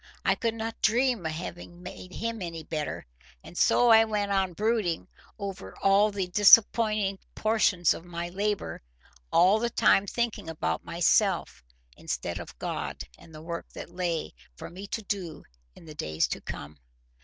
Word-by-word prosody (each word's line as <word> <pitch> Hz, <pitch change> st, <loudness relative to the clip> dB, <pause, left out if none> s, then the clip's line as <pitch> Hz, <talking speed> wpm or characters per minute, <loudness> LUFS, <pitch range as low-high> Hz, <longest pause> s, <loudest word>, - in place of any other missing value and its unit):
I -, -, +4 dB
could 230 Hz, -1 st, -2 dB
not 225 Hz, 0 st, -5 dB
dream 235 Hz, -5 st, +2 dB
of -, -, -2 dB
having 175 Hz, +1 st, -8 dB
made 185 Hz, 0 st, -9 dB
him 230 Hz, -1 st, -4 dB
any 165 Hz, -2 st, -5 dB
better. 155 Hz, -2 st, -4 dB, 0.4 s
And -, -, -12 dB
so 245 Hz, -, +4 dB
I 225 Hz, 0 st, +8 dB
went 210 Hz, -2 st, -1 dB
on 190 Hz, -2 st, +1 dB
brooding 210 Hz, -4 st, 0 dB, 0.3 s
over 200 Hz, -2 st, -7 dB
all 195 Hz, +2 st, +4 dB
the 200 Hz, -2 st, -2 dB
disappointing 210 Hz, +1 st, +5 dB, 0.2 s
portions 210 Hz, -6 st, +2 dB
of -, -, -9 dB
my 175 Hz, -1 st, -5 dB
labour, 205 Hz, +3 st, -2 dB, 0.5 s
all 185 Hz, +5 st, +5 dB
the 235 Hz, +1 st, 0 dB
time 200 Hz, -3 st, +3 dB
thinking 235 Hz, -6 st, -2 dB
about 80 Hz, -, -2 dB
myself, 175 Hz, -, +1 dB, 0.3 s
instead -, -, -4 dB
of -, -, -10 dB
God -, -, -4 dB, 0.2 s
and 165 Hz, -, -16 dB
the 155 Hz, 0 st, -11 dB
work 170 Hz, 0 st, -5 dB
that -, -, -8 dB
lay 170 Hz, -, -2 dB, 0.2 s
for -, -, -9 dB
me 190 Hz, +3 st, -8 dB
to 225 Hz, -, -4 dB
do 180 Hz, -7 st, -4 dB, 0.3 s
in -, -, -15 dB
the 155 Hz, -, -10 dB
days 80 Hz, -, -1 dB
to -, -, -4 dB
come. 75 Hz, 0 st, -8 dB
195 Hz, 165 wpm, -28 LUFS, 170-215 Hz, 0.5 s, I